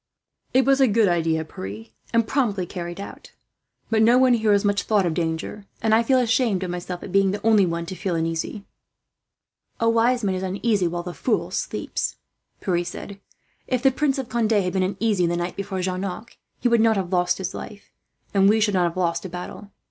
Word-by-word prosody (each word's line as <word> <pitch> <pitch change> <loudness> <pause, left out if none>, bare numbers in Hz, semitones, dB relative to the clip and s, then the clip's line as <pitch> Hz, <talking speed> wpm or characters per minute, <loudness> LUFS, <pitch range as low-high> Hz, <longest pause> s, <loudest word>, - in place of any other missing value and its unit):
"It 260 +1 +3
was 275 0 +4
a 265 - +6
good 220 -1 +3
idea, 165 -2 +1
Pierre, 105 -5 -8 0.3
and 230 -1 +3
promptly 215 -10 0
carried 175 0 -6
out. 200 - -10 0.6
But 220 -1 +3
no 235 +3 +6
one 255 -1 +5
here 220 -2 +2
has 200 0 +3
much 200 0 +2
thought 210 -3 +2
of 170 - 0
danger, 165 +5 -3
and 220 -1 +1
I 225 - +5
feel 260 +3 +3
ashamed 225 -5 +2
of 180 - -3
myself 180 0 -5
at 195 - -7
being 195 0 +3
the 205 +3 -4
only 215 -4 +5
one 170 0 -2
to 175 - -6
feel 185 -1 -2
uneasy." 165 +5 -3 1.1
"The 230 - +3
wise 235 +1 +2
man 195 -2 +1
is 185 - -3
uneasy 195 0 0
while 175 +1 -3
the 175 0 -6
fool 230 +3 -1
sleeps," - - -3 0.5
Pierre 175 -2 0
said. 195 +3 -8 0.5
"If 255 -1 -1
the 270 - +5
Prince 275 +1 0
of 265 -3 -3
Conde 230 -2 0
had 185 -4 +1
been 190 - +1
uneasy, 190 -1 +1
the 170 0 -1
night 175 +1 -3
before 195 -1 -4
Jarnac, 190 +4 -4 0.2
he - - +1
would 235 -2 +4
not 225 -1 +4
have 190 -1 -3
lost 180 0 +2
his 190 -2 -4
life, 205 -1 -9 0.4
and 195 0 +5
we 220 +1 +4
should 210 -1 +2
not 180 -2 +3
have 170 +1 -3
lost 170 -2 0
a - - -5
battle. 180 +3 -8
195 Hz, 215 wpm, -23 LUFS, 180-225 Hz, 1.1 s, a